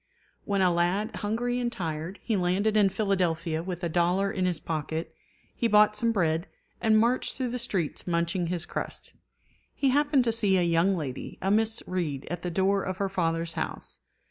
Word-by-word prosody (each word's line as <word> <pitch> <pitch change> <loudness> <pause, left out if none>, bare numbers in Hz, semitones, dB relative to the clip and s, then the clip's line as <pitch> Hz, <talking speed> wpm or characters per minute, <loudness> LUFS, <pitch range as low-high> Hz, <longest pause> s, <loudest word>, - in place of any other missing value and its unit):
] - - -39
When 200 -1 +1
a 180 - +4
lad, 185 +6 0
hungry 240 +4 -1
and 240 -1 -1
tired, 165 -3 -4
he 225 - 0
landed 195 +4 +1
in 205 -2 +5
Philadelphia 175 -5 0
with 180 0 -5
a - - +1
dollar 180 +4 +1
in 185 -3 0
his 175 -3 -1
pocket, 160 +1 -3 0.4
he 235 - +1
bought 210 -1 +5
some 230 +2 +1
bread, 170 -4 +1 0.3
and 220 -2 +4
marched 240 +3 +1
through 260 -2 -2
the 250 - -3
streets 190 -11 -2
munching 170 +1 0
his 175 -1 -2
crust. - - -4 0.6
He 275 - +2
happened 290 -1 +3
to 235 - +1
see 205 -4 +2
a 180 - +3
young 170 +3 +2
lady, 135 -5 -5
a 195 - 0
Miss 220 +1 +2
Read, 160 -7 -3
at 175 -1 -3
the 180 - -3
door 195 +3 +2
of 185 -1 -3
her 195 0 -1
father's 165 -3 -1
house. - - -4
190 Hz, 195 wpm, -28 LUFS, 170-215 Hz, 0.6 s, in